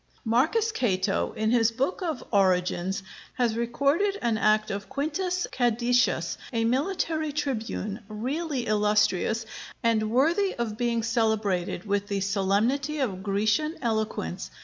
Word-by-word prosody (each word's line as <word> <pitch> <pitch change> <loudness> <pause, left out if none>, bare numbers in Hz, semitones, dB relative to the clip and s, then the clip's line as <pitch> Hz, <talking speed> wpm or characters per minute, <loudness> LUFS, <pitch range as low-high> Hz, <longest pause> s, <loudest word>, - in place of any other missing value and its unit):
] - - -34
Marcus 315 - +2
Cato, 195 - 0
in 220 0 0
his 230 -2 +4
book 265 +12 -2
of 320 -8 -3
'Origins,' 185 -1 +1 0.3
has 240 -3 +1
recorded 280 - +1
an 235 -2 +2
act 215 0 +2
of 200 0 -5
Quintus 355 +5 -1
Cædicius, 245 0 +1
a 230 -2 0
military 310 +4 0
tribune, 230 -7 -3
really 260 +5 -3
illustrious, 210 0 +2 0.4
and 220 -2 +2
worthy 330 - +2
of 230 -3 -3
being 235 0 0
celebrated 220 -6 0
with 205 0 -1
the 200 -2 -1
solemnity 210 +10 +1
of 210 -10 -2
Grecian 215 - 0
eloquence. 220 - -2
230 Hz, 125 wpm, -27 LUFS, 210-275 Hz, 0.4 s, his